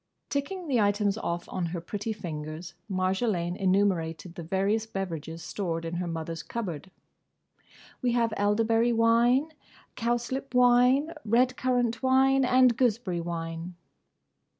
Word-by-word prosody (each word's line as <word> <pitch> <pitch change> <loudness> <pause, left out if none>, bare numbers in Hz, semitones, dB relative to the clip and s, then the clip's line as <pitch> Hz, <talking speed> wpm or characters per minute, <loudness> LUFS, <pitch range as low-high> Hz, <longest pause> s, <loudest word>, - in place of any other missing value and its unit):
Ticking 335 +6 -3
the 250 -6 +2
items 205 0 +2
off 175 -5 -3
on 180 -2 -3
her 170 +1 -4
pretty 205 +6 -4
fingers, 165 -3 -6 0.2
Marjolaine 185 -1 0
enumerated 185 -3 0
the 175 - -7
various 195 +6 0
beverages 170 -6 -5
stored 165 -4 -3
in 165 +1 -3
her 180 0 -2
mother's 165 0 -4
cupboard. 190 -6 -5 1.1
"We 245 -2 +1
have 230 -2 +1
elderberry 225 +3 +2
wine; 235 +6 +3 0.4
cowslip 240 +3 -2
wine; 250 +5 +5
red 245 +4 +2
currant 245 -2 0
wine; 265 +1 +4
and 255 -1 +5
gooseberry 220 -7 0
wine." 165 +1 -5
205 Hz, 125 wpm, -28 LUFS, 175-245 Hz, 1.1 s, wine